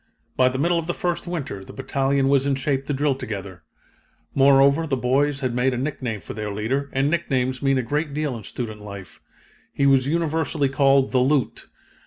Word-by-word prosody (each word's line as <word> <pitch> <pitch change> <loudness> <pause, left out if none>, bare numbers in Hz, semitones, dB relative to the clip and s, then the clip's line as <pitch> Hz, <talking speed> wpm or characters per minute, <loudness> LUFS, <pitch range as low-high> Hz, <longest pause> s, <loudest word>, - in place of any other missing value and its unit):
"By 130 0 +4
the 130 - -4
middle 170 +4 +2
of 165 - -6
the 175 - -2
first 175 0 -2
winter 140 - -4
the - - -12
battalion 135 0 0
was 140 0 +3
in 140 - +2
shape 135 0 -2
to 145 - -1
drill 145 +1 +1
together. 100 -8 -7 0.7
Moreover, 140 +3 +4
the 135 -3 0
boys 135 +3 +1
had 130 -2 -1
made 125 +1 +1
a - - -3
nickname 125 -6 -3
for - - -8
their 105 0 -4
leader, 130 +8 -2
and 135 +1 +1
nicknames 130 -6 -1
mean 135 -1 +2
a 130 - 0
great 150 +5 -2
deal 145 -2 -2
in 110 - -8
student 110 0 -6
life. 100 -2 -10 0.5
He 140 - 0
was 135 -1 +4
universally 160 -2 0
called 135 0 +3
'the 130 - +3
Lieut.' 135 +1 0
135 Hz, 200 wpm, -23 LUFS, 125-145 Hz, 0.7 s, By